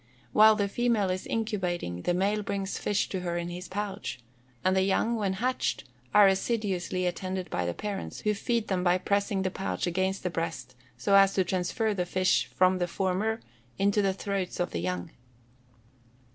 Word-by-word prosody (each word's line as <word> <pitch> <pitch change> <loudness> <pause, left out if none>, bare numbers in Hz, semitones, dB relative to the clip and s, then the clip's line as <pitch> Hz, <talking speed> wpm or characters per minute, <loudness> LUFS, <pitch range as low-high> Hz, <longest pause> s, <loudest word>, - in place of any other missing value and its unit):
While 215 0 +7
the 205 -1 0
female 220 -3 +1
is 185 0 -3
incubating, 180 - -2
the 175 - 0
male 200 +3 +1
brings 200 -1 -3
fish 205 -1 0
to 190 - -2
her 175 -1 -2
in 170 0 -3
his 180 +1 -6
pouch, 200 -7 -4 0.5
and 185 - +3
the 190 - +4
young, 195 +5 +2
when 200 -4 0
hatched, 250 +6 -1 0.3
are 205 -1 +7
assiduously 190 -3 0
attended 185 +1 -3
by 90 -1 -1
the 85 - -2
parents, 205 -2 -5
who 210 - +1
feed 230 +2 -1
them 185 -2 0
by 180 0 +4
pressing 200 0 0
the 185 - -1
pouch 195 +1 -2
against 190 +2 -1
the 180 - -1
breast, 165 -7 -4 0.2
so 125 +12 0
as 195 0 +6
to 190 - +3
transfer 190 +5 0
the 180 -3 -2
fish 185 +1 +2
from 185 0 +2
the 175 - 0
former 195 +5 -1 0.4
into 200 +1 +3
the 195 -1 +2
throats 195 -2 -3
of 175 0 0
the - - -2
young. 90 0 -3
190 Hz, 185 wpm, -28 LUFS, 180-205 Hz, 0.5 s, While